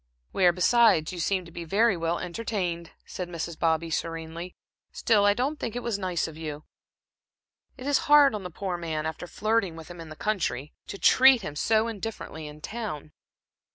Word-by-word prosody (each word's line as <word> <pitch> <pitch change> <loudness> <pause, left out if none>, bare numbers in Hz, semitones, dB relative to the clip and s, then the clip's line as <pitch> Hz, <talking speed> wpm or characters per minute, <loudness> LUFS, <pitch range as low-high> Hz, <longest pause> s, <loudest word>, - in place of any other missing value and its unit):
"Where, 180 -2 +4
besides, 185 -2 +4
you 175 - -6
seemed 185 +1 0
to 170 - -13
be 170 0 -6
very 200 +5 +3
well 165 0 -1
entertained," 180 -3 -3 0.2
said 180 -1 -6
Mrs. 170 -1 -5
Bobby, 165 0 +1
serenely. 165 +2 -4 0.4
"Still, 210 -4 +2
I 205 0 +4
don't 275 +6 -1
think 230 - -4
it 245 - -3
was 230 -4 -2
nice 180 -3 -1
of 160 - -9
you. 155 -1 -6 1.1
It 255 - -9
is 285 0 +3
hard 290 -4 +7
on 210 - -3
the 180 - -6
poor 180 +1 -4
man, 160 -3 -3
after 160 +2 -5
flirting 215 -3 0
with 160 0 -10
him 175 -1 -9
in 165 - -10
the 155 - -9
country, 170 - -2
to - - -6
treat 260 +1 +6
him 150 - -5
so 220 +8 +2
indifferently 205 -8 -6
in 150 0 -11
town." 175 -8 -5
180 Hz, 190 wpm, -27 LUFS, 165-220 Hz, 1.1 s, hard